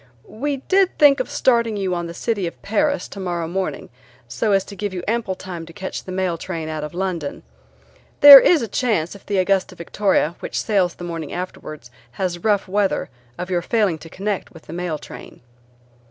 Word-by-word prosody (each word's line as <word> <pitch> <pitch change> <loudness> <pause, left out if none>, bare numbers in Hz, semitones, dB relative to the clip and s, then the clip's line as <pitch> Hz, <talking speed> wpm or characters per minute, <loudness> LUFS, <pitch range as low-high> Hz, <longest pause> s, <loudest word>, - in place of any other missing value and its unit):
"We 280 +5 -3
did 385 -1 +3
think 285 -3 +6
of 255 - -2
starting 235 -6 +2
you 190 -2 -1
on 175 -1 -3
the 170 - -8
City 205 -3 -1
of 170 - -8
Paris 285 +8 0
tomorrow 175 -4 -4
morning, 185 +2 -3 0.4
so 220 - -1
as 195 -1 +3
to 200 - -11
give 205 -2 -4
you 180 - -4
ample 220 -4 -1
time 180 -3 -7
to 165 - -12
catch 190 +2 -6
the 185 - -8
mail 185 -3 -1
train 165 -3 -5
out 155 -1 -4
of 150 +3 -7
London. 180 -5 -3 0.8
There 285 -1 +13
is 315 -1 +4
a - - -3
chance 205 -7 0
if 200 - -15
the 205 - 0
Augusta 190 0 +1
Victoria, 175 -1 0
which - - -4
sails 195 -5 +1
the - - -10
morning 165 -3 -5
afterwards, 155 -7 -7 0.2
has 175 +4 -2
rough 205 -2 +1
weather 200 +1 0 0.3
of 180 +1 -5
your 175 -1 +1
failing 195 -4 0
to 165 - -12
connect 200 +3 -4
with 165 - -15
the 155 - -10
mail 175 -2 -3
train." 150 - -12
190 Hz, 195 wpm, -21 LUFS, 175-215 Hz, 0.8 s, There